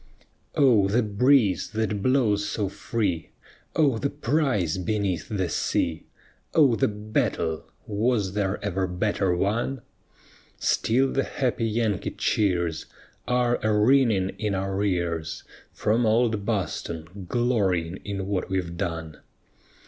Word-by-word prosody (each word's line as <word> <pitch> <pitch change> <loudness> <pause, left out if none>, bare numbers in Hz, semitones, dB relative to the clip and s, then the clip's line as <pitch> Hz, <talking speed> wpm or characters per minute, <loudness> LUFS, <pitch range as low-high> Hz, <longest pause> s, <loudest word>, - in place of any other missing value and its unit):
Oh, 120 -9 +5
the 115 +5 +2
breeze 110 0 +3
that 110 -2 -1
blows 105 -5 +2
so 105 -3 -1
free! 100 -4 -2 0.5
Oh, 140 -8 +3
the 140 - 0
prize 130 - 0
beneath 100 -2 -1
the 95 -4 -1
sea! 80 0 -1 0.5
Oh, 145 -6 +6
the 100 - +2
battle! 105 -6 -2 0.2
was 105 -2 0
there 100 -1 0
ever 95 -1 0
better 90 0 0
won? 115 +7 -1 0.7
Still 130 +4 +2
the 135 - +1
happy 120 -4 -1
Yankee 110 -4 0
cheers 85 -6 0 0.4
Are 125 -1 +2
a 110 -1 +2
ringing 110 -5 +4
in 105 -2 -1
our 95 +1 -1
ears 85 -4 -2 0.3
From 115 +2 +1
old 110 -2 +2
Boston, 90 -3 -3
glorying 95 -8 +1
in 100 -1 -5
what 95 -2 -2
we've 90 -3 -2
done. 80 -4 -4
105 Hz, 120 wpm, -25 LUFS, 95-115 Hz, 0.7 s, Oh